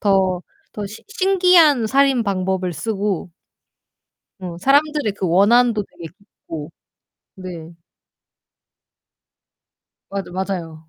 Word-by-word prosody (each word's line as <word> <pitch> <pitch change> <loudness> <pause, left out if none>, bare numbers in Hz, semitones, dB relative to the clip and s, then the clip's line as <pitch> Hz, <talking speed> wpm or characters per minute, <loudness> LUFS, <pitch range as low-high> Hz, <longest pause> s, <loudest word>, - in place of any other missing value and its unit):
더 190 -3 +2 0.3
더 210 -1 -4
신 210 +3 -11
신기한 360 - +4
살인 270 0 +3
방법을 190 -2 -1
쓰고 200 +2 -2 1.1
어 175 -2 -7
사람들의 285 - +2
그 195 -2 -3
원한도 215 +4 +4
되게 165 - -11
깊고. 165 -6 -10 0.7
네. 175 -3 -9 2.4
맞아, 195 -2 -5
맞아요. 170 -4 -5
200 Hz, 175 characters per minute, -20 LUFS, 180-245 Hz, 2.4 s, 신기한